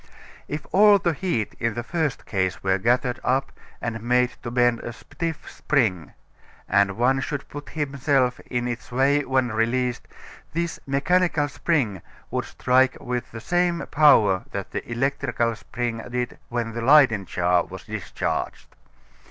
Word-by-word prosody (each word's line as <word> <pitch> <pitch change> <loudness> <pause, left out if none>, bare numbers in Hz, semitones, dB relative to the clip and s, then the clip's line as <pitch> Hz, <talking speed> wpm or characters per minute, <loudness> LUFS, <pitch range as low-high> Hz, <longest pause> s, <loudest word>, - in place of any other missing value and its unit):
If 150 0 -5
all 205 +1 +7
the 175 -4 0
heat 145 - -2
in 115 -1 -1
the 120 - -3
first 155 +1 -2
case 95 -4 -1
were 95 0 +2
gathered 125 +4 +1
up 135 +2 0 0.3
and 115 -1 -4
made 125 +1 +2
to 120 - -5
bend 120 -1 +2
a 120 - -6
stiff 165 +6 -6
spring, 105 - 0 0.5
and 100 +1 +2
one 130 +3 +3
should 145 0 -4
put 145 0 -8
himself 140 -3 0
in 120 -1 -1
its 120 +1 -5
way 140 +4 +3
when 130 -2 +1
released, 120 +2 0 0.5
this 170 +1 -2
mechanical 150 +2 +2
spring 130 - -1 0.3
would - - -1
strike 130 +1 +2
with 125 -2 -4
the 115 - -7
same 175 +2 0
power 110 -11 +5
that 100 -1 -5
the - - -5
electrical 120 -2 0
spring 120 0 -4
did 125 0 -3
when 120 -1 -2
the 115 - -4
Leyden 125 -6 +5
jar 90 +1 +2
was - - -10
discharged. - - -4
125 Hz, 150 wpm, -24 LUFS, 115-145 Hz, 0.5 s, all